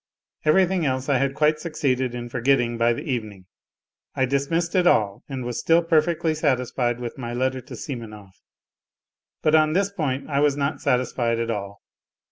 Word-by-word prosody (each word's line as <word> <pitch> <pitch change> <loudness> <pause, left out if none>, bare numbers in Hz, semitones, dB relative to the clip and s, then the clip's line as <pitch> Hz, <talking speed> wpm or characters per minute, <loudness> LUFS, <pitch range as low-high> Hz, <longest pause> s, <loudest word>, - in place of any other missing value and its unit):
Everything 185 +2 +3
else 130 -1 -1
I 135 -3 +3
had 135 +1 0
quite 155 0 +2
succeeded 130 -6 -1
in 120 0 -5
forgetting 120 0 +1
by 115 +1 +2
the 115 - -3
evening; 110 - -4 0.7
I 130 - +2
dismissed 140 +6 -1
it 180 -2 +3
all 100 - +2
and 130 -3 -4
was 120 -1 -3
still 165 +1 +3
perfectly 165 0 +2
satisfied 125 -5 0
with 120 +1 -6
my 120 -1 -4
letter 130 +1 -1
to - - -10
Simonov. 110 -7 -8 1.1
But 155 - +3
on 155 -1 +4
this 200 +2 +1
point 140 -8 -2
I 140 -2 0
was 145 -1 +2
not 140 +1 -2
satis 125 -3 +1
fied 115 -2 0
at 115 0 -1
all. 100 -2 -6
130 Hz, 175 wpm, -23 LUFS, 120-155 Hz, 1.1 s, on